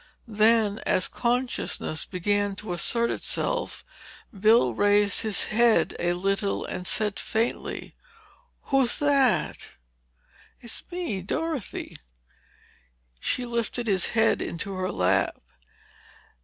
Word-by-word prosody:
Then, 215 -1 +3
as 185 - +1
consciousness 245 -9 -1
began 205 +2 -1
to 205 -2 -5
assert 235 +6 +2
itself, - - -3 0.5
Bill 210 - +4
raised 205 - +3
his 220 -3 0
head 235 +1 +3
a 175 0 +1
little 195 +3 -1
and 180 0 -5
said 210 -2 0
faintly: 225 +2 -2 0.8
"Who's 270 -3 +4
that?" 280 -4 +2 0.9
"It's 235 -2 -5
me—Dorothy." 315 - -3 1.2
She 250 - -1
lifted 235 0 -2
his 195 -5 +2
head 225 -1 +2
into 195 +4 -4
her 185 0 -2
lap. 90 0 +1
215 Hz, 100 wpm, -26 LUFS, 195-240 Hz, 1.2 s, Bill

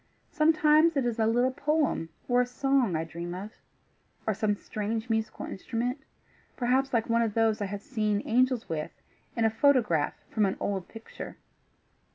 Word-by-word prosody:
Sometimes 310 0 +4
it 270 - +1
is 235 -1 -1
a 220 - +3
little 245 +3 +2
poem 290 - 0 0.2
or 245 0 +4
a - - +1
song 255 - +1
I 160 - 0
dream 170 +2 -6
of, 200 +4 -6 0.7
or 220 - +1
some 205 +1 0
strange 220 +3 -4
musical 220 0 -2
instrument, 240 +7 -3 0.6
perhaps 260 +2 +1
like 230 -2 +1
one 230 0 +2
of 225 -3 -1
those 225 -1 +2
I - - 0
have 200 +1 -6
seen 215 -6 -1
angels 250 0 +2
with 155 -2 -3 0.5
in 230 - +2
a 220 - +3
photograph 220 - +2 0.2
from 210 -3 +2
an 190 - -2
old 195 -3 -2
picture. 225 0 -9
225 Hz, 170 wpm, -28 LUFS, 205-255 Hz, 0.7 s, Sometimes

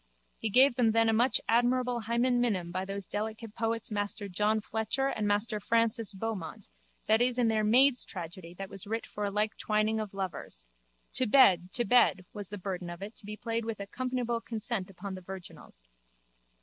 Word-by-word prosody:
He 225 - -2
gave 255 +3 +5
them 230 -3 +3
then 225 0 +4
a - - +3
much 240 +4 +3
admirable 245 +1 +2
hymen 240 +2 +1
minim 185 -8 0
by 185 +1 -2
those 195 0 -4
delicate 220 +2 -5
poets 225 0 -2
Master 205 0 -2
John 210 +3 +1
Fletcher 220 +5 -1
and 215 -5 -2
Master 210 +1 0
Francis 230 0 +2
Beaumont 200 -4 -5 0.4
that 220 +2 +4
is 245 0 +2
in 240 -2 +3
their 215 -1 +1
Maid's 250 +4 +5
Tragedy 175 -1 -8
that 195 +1 -6
was 195 0 -8
writ 225 +2 -2
for 210 - -4
a - - 0
like 210 +1 0
twining 215 +1 +1
of 210 -2 -5
lovers: 175 - -5 0.5
To 255 - +2
bed, 185 -8 +5
to 240 - +3
bed 195 -5 +4
was 205 -3 -7
the 205 - -6
burden 180 -2 -5
of 175 +2 -7
it 215 +3 -8
to 205 - -6
be 210 0 -6
played 230 +1 -2
with 225 -1 -4
accompanable 240 +2 -3
concent 220 -4 -3
upon 195 +1 -7
the 185 - -7
virginals. 180 - -10
215 Hz, 190 wpm, -30 LUFS, 195-235 Hz, 0.5 s, gave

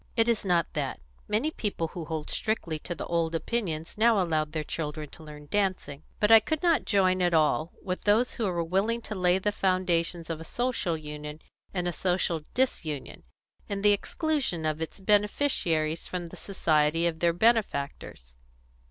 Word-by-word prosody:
"It 225 -1 +3
is 230 -2 +1
not 175 -3 +2
that. 145 -4 -2 0.3
Many 225 +9 +1
people 200 - -2
who 170 -1 -6
hold 155 -1 -4
strictly 175 -8 -1
to 175 - -4
the - - -5
old 165 -1 0
opinions 165 -2 -2
now 225 -1 +5
allow 160 -4 +1
their 155 0 -4
children 150 -1 -4
to 160 - -11
learn 150 -1 -10
dancing. 185 -8 -1 0.2
But 210 +1 +3
I 225 - +11
could 315 +9 -3
not 335 -2 +3
join 185 -3 +3
at 175 -2 +3
all 155 +1 +2
with 185 -1 -3
those 220 +4 +3
who 230 - -2
were 175 -3 0
willing 195 +7 0
to 220 - -6
lay 180 -2 +3
the 205 +2 0
foundations 175 -3 0
of 160 -1 -4
a - - -5
Social 235 -4 -1
Union 150 0 -7 0.3
in 180 -2 -2
a 175 - -1
social 180 -3 0
disunion 160 - -1 0.5
in 200 -1 -3
the 205 - +7
exclusion 255 - -1
of 155 0 -1
its 160 - -5
beneficiaries 195 - +1
from 180 -1 -4
the 165 - -10
society 165 -4 +1
of 165 -1 -1
their 170 0 +3
benefactors." 145 - 0
175 Hz, 180 wpm, -28 LUFS, 160-210 Hz, 0.5 s, I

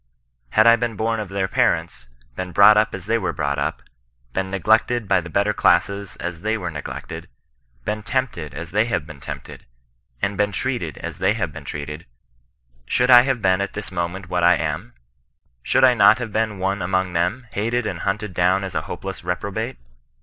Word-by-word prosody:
Had 110 - +4
I 115 0 +7
been 120 -1 -2
bom 115 +2 -1
of 105 -3 -5
their 95 -1 -1
parents, - - 0 0.3
been 90 -1 -4
brought 100 +3 +8
up 105 +1 +2
as 95 -2 -9
they 115 +2 +1
were - - -2
brought 70 -2 -1
up, 70 - -2 0.5
been 95 0 -1
ne 95 - -2
glected 110 +2 +2
by 90 - +3
the 85 - -9
better 100 +4 +1
classes 100 -2 +1
as 85 -2 -5
they 110 +2 0
were 90 -5 -4
neglected, 75 -2 -7 0.6
becQ 105 0 -2
tempted 105 - -2
as 85 -1 -7
they 105 +3 +2
have 115 -10 -1
been 80 -3 -11
tempted, - - -9 0.5
and 100 +9 -1
been 105 0 +2
treated 95 - -3
as - - -7
they 95 +3 +2
have 90 -9 -2
been 75 -2 -9
treated, 75 +3 -6 0.8
should 125 - +2
I 120 -1 +10
have 130 -3 -1
been 95 0 +3
at 100 - -3
this 105 -1 -6
moment 90 +1 -3
what 90 0 -1
I 90 +1 +6
am 85 +9 -3 0.7
1 - - -45
Should 130 - +2
I 130 -1 +7
not 105 -1 +6
have 115 -4 -5
been 110 -2 0
one 95 +1 -1
among 95 0 0
them, 90 +9 0
hated 115 +3 -1
and 90 -5 -3
hunted 105 +1 -2
down 90 +3 +2
as 95 - -5
a - - 0
hopeless 95 -2 -6
reprobate 100 +7 -3
100 Hz, 200 wpm, -22 LUFS, 90-110 Hz, 0.8 s, I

